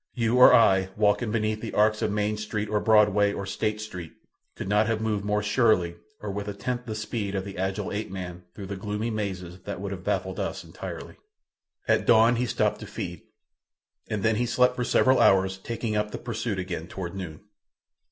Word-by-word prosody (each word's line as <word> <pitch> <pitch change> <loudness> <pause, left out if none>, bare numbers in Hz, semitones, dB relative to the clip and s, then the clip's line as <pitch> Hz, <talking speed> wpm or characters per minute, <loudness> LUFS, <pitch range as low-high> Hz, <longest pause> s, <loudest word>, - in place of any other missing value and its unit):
You 115 0 +1
or 125 - +10
I 95 -6 +5
walking 105 +1 +2
beneath 110 -1 -1
the - - -5
arcs 110 +1 +3
of 105 - 0
Main 105 +1 0
Street, 105 0 -3
or 105 -1 +1
Broadway, 105 -2 +4
or 100 - -4
State 105 +2 -2
Street, 90 -6 -7 0.4
could - - -6
not 105 +2 +3
have 115 -1 0
moved 110 -2 -1
more 105 0 0
surely 105 -6 +2 0.3
or 105 - -4
with 100 +1 -4
a 105 - -4
tenth 125 +4 -4
the 110 - -3
speed 105 -2 -3
of 95 0 -2
the 100 -1 -7
agile 95 +2 -2
ape 105 +2 -3
man 90 -2 -6
through 100 - -7
the 100 +1 -5
gloomy 105 +3 -3
mazes 95 -4 -4
that - - -5
would 100 0 -4
have 95 -2 -6
baffled - - -2
us - - -3
entirely. - - -8 0.7
At - - +2
dawn 115 +1 +6
he 125 +1 0
stopped - - 0
to - - -8
feed, - - -6 0.9
and 105 -2 -3
then 110 -1 +2
he 120 +1 0
slept 125 +1 +3
for 125 - -1
several 130 +1 +4
hours, 95 0 +4
taking 115 +1 -3
up 105 0 0
the - - -5
pursuit 115 -3 -3
again 90 -3 -4
toward 90 -3 -6
noon. 90 -6 -7
105 Hz, 205 wpm, -26 LUFS, 95-110 Hz, 0.9 s, or